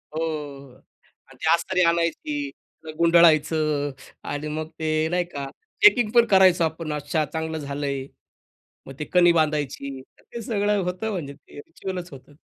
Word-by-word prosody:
हो 160 - -1 1.0
आणि - - -18
ते 160 - +2
अस्तरी 180 +2 0
आणायची, 165 -4 0 0.3
मग 155 - -6
गुंडाळायचं 155 -3 +3 0.3
आणि 145 +1 -4
मग 155 +1 -4
ते 155 0 0
नाही 180 0 +1
का 140 -5 -6 0.4
चेकिंग 245 - +6
पण 235 - +7
करायचो 190 -3 +5
आपण. 160 -1 -3
अच्छा, 150 +1 -1
चांगलं 160 +1 -4
झालंय. 140 -2 -4 0.8
मग 135 - -8
ते 150 - -3
कणी 175 -1 +6
बांधायची. 145 -4 -1 0.2
ते 235 - -9
सगळं 205 -2 0
होतं 180 +5 -3
म्हणजे 150 -8 -5
ते 145 - -18
रिच्युअलच 180 +3 -7
होतं. 135 +1 -14
160 Hz, 145 wpm, -24 LUFS, 145-180 Hz, 1.0 s, पण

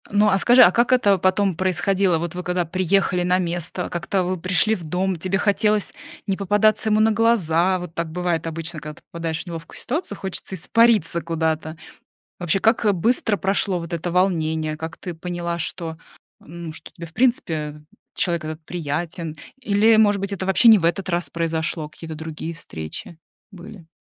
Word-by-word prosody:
Ну, 205 +1 +3
а 195 - +3
скажи, 245 +4 +7
а 175 - +7
как 235 +5 +2
это 205 -6 +4
потом 190 +1 +2
происходило? 185 +1 +1
Вот 170 0 -4
вы 180 0 -5
когда 180 0 -1
приехали 185 +1 +1
на 180 +1 +2
место, 175 -1 -2
как-то 185 +2 -1
вы 185 +1 -2
пришли 185 +4 +2
в 180 - -8
дом, 180 +4 -1
тебе 185 +3 -1
хотелось 210 0 +1 0.3
не 195 -1 0
попадаться 210 +2 +2
ему 215 0 +3
на 220 +1 +4
глаза? 190 -6 +2
Вот 175 -2 -8
так 170 -1 -3
бывает 170 -1 -1
обычно, 165 0 -5
когда 150 +1 -8
ты - - -19
попадаешь 165 -1 -3
в - - -25
неловкую 165 0 -8
ситуацию, 265 - -4
хочется 190 0 -5
испариться 210 -3 +3
куда-то. 160 -1 -2 0.6
Вообще, 175 +1 +1
как 220 -1 +3
быстро 220 +3 +1
прошло 195 -1 0
вот 170 0 -8
это 170 +1 -3
волнение? 160 -4 0
Как 160 +2 -6
ты 180 - -6
поняла, 170 0 -4
что 165 0 -5 0.4
ну, 170 0 -8
что - - -10
тебе, 170 -2 -9
в 165 - -16
принципе, 160 - 0 0.3
человек 170 -3 0
этот 155 +1 -7
приятен 165 0 -4 0.2
или, 220 -1 +4
может 205 -2 +4
быть, 200 +1 -3
это 190 -1 -3
вообще 190 +5 +5
не 220 -2 +9
в 170 - -4
этот 185 +3 0
раз 170 -3 0
произошло, 160 -1 -2
какие-то 160 +1 -9
другие 160 +1 -6
встречи 80 - -8 0.3
были? 195 -2 -12
175 Hz, 180 wpm, -22 LUFS, 165-200 Hz, 0.6 s, не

